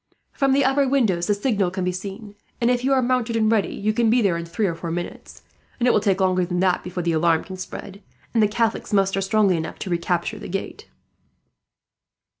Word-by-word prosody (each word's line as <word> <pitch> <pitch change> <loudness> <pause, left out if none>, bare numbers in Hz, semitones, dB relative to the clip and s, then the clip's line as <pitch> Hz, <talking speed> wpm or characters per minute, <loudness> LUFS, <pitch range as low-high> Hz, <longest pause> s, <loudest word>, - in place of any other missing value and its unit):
From 270 -1 +1
the 280 +1 +3
upper 270 +1 +2
windows 220 -11 +1
the 205 - +2
signal 205 -4 0
can 185 +1 -4
be 180 - 0
seen 200 +3 -7 0.3
and, 240 +1 +2
if 245 0 0
you 270 - +1
are 265 -1 +3
mounted 245 -2 0
and 220 -1 +2
ready, 220 -3 +1
you 215 +1 -1
can 230 0 +2
be 240 +3 +4
there 195 -7 +2
in 170 0 -4
three 180 +6 -2
or 175 - 0
four 165 +1 -6
minutes; 175 +1 -6 0.4
and 245 - +2
it - - +6
will 215 - +3
take 200 -2 +1
longer 185 -1 +2
than 175 0 -2
that 185 -1 +2
before 180 -1 -4
the 170 - +1
alarm 165 0 +2
can 190 - -8
spread, 195 +2 -8 0.3
and 230 - +3
the 210 - +5
Catholics 225 +1 -1
muster 195 -1 +2
strongly 195 -2 +2
enough 160 - -5
to 185 - -5
recapture 175 +4 -1
the - - -8
gate." 195 +2 -5
200 Hz, 225 wpm, -23 LUFS, 180-230 Hz, 0.4 s, it